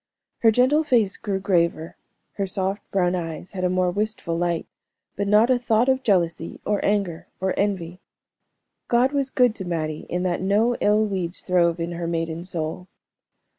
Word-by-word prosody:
Her 225 Hz, -, +5 dB
gentle 255 Hz, +7 st, +4 dB
face 235 Hz, -9 st, +2 dB
grew 200 Hz, -3 st, -3 dB
graver, 170 Hz, -4 st, 0 dB, 0.4 s
her 195 Hz, -1 st, -2 dB
soft 190 Hz, +2 st, -2 dB
brown 180 Hz, -2 st, +1 dB
eyes 170 Hz, 0 st, -5 dB
had 185 Hz, -2 st, -5 dB
a 180 Hz, -, +2 dB
more 180 Hz, 0 st, +1 dB
wistful 205 Hz, -3 st, -2 dB
light, 170 Hz, -1 st, -1 dB, 0.5 s
but 200 Hz, 0 st, -2 dB
not 215 Hz, +4 st, +5 dB
a 250 Hz, -, +3 dB
thought 235 Hz, 0 st, +2 dB
of 265 Hz, 0 st, +2 dB
jealousy, 170 Hz, -7 st, 0 dB
or 210 Hz, -1 st, 0 dB
anger, 200 Hz, -5 st, -1 dB
or 190 Hz, 0 st, 0 dB
envy. 185 Hz, -3 st, -2 dB, 0.9 s
God 245 Hz, +3 st, +3 dB
was 280 Hz, -2 st, 0 dB
good 250 Hz, -3 st, +3 dB
to 190 Hz, -, -5 dB
Mattie 155 Hz, -3 st, -3 dB
in 180 Hz, +1 st, -1 dB
that 180 Hz, -1 st, -1 dB
no 210 Hz, +5 st, +2 dB
ill 210 Hz, +1 st, +3 dB
weeds 185 Hz, -4 st, -3 dB
throve 175 Hz, -2 st, +2 dB
in 170 Hz, +1 st, -3 dB
her 170 Hz, 0 st, -4 dB
maiden 165 Hz, 0 st, -3 dB
soul. 170 Hz, 0 st, -4 dB
190 Hz, 170 wpm, -23 LUFS, 170-215 Hz, 0.9 s, Her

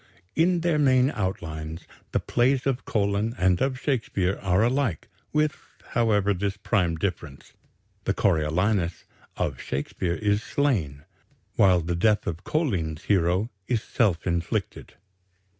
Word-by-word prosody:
In 170 Hz, +1 st, +3 dB
their 165 Hz, -3 st, +1 dB
main 130 Hz, -1 st, +4 dB
outlines, 80 Hz, -, -4 dB, 0.3 s
the -, -, +1 dB
plays 125 Hz, +2 st, +1 dB
of 135 Hz, -2 st, -1 dB
Collin 105 Hz, +2 st, 0 dB
and 90 Hz, -1 st, +2 dB
of 130 Hz, -1 st, 0 dB
Shakespeare 100 Hz, -9 st, -1 dB
are 95 Hz, +2 st, +2 dB
alike, 125 Hz, -, 0 dB, 0.2 s
with, 150 Hz, 0 st, +1 dB, 0.3 s
however, 105 Hz, -4 st, +2 dB
this 100 Hz, +2 st, -2 dB
prime 95 Hz, -5 st, +1 dB
difference 80 Hz, -5 st, -5 dB, 0.5 s
the -, -, +1 dB
Coriolanus 85 Hz, +3 st, +1 dB, 0.3 s
of -, -, -2 dB
Shakespeare 85 Hz, +5 st, -2 dB
is 105 Hz, 0 st, +1 dB
slain, 95 Hz, -, -1 dB, 0.5 s
while 90 Hz, -3 st, +5 dB
the 85 Hz, +1 st, -2 dB
death 105 Hz, +4 st, +2 dB
of 85 Hz, +2 st, -4 dB
Collin's 90 Hz, -, -1 dB
hero 95 Hz, +3 st, +1 dB, 0.2 s
is 115 Hz, -4 st, 0 dB
self 100 Hz, -8 st, +1 dB
inflicted. 85 Hz, -2 st, -2 dB
100 Hz, 125 wpm, -26 LUFS, 85-120 Hz, 0.5 s, while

